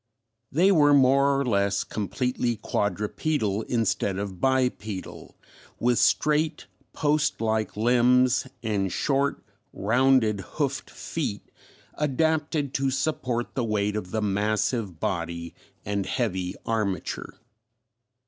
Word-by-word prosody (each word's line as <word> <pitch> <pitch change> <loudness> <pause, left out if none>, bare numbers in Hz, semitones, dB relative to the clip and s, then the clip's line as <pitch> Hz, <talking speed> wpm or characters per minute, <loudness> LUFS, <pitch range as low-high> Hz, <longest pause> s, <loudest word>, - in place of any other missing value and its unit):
They 180 +7 +4
were 145 -5 +5
more 140 +1 +4
or 140 - 0
less 100 -4 +1
completely 120 +3 -2
quadrupedal 105 +2 -1
instead 105 -4 0
of 95 -3 -5
bipedal, 125 -7 -1 0.4
with 120 -1 +2
straight 150 +4 +2 0.3
post 150 0 +1
like 110 -2 -1
limbs 125 +3 +3 0.2
and 100 -4 0
short 140 +7 0 0.3
rounded 120 0 +2 0.2
hoofed 140 -3 -1
feet 140 -11 -5 0.4
adapted 150 0 0
to 135 -1 +1
support 130 -3 -2
the 125 - -1
weight 105 -2 0
of 105 -4 -4
the 110 +2 -2
massive 105 -1 0
body 85 -1 -3 0.3
and 100 -1 -2
heavy 95 -8 -2
armature. 105 -6 -2
120 Hz, 105 wpm, -26 LUFS, 105-135 Hz, 0.4 s, were